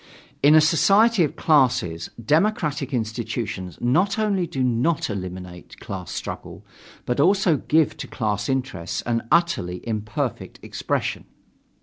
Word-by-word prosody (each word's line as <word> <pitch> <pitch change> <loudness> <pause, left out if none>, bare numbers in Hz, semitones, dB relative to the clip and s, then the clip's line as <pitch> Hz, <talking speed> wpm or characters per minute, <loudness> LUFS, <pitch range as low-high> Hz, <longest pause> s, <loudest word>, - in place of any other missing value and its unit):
In 145 +2 +6
a 155 - +8
society 195 +6 +4
of 150 - -2
classes, 125 - +2
democratic 150 - 0
institutions 110 - -3
not 175 - +2
only 200 -5 0
do 135 -4 -2
not 125 +4 +1
eliminate 90 -2 -7
class 95 -2 -7
struggle, - - -7 0.4
but 125 +2 -1
also 180 0 +3
give 155 +2 +1
to - - -6
class 105 -3 -2
interests 130 -11 -2
an 115 -1 0
utterly 120 - +1
imperfect 110 -1 -3
expression. - - -3
130 Hz, 120 wpm, -23 LUFS, 105-165 Hz, 0.4 s, a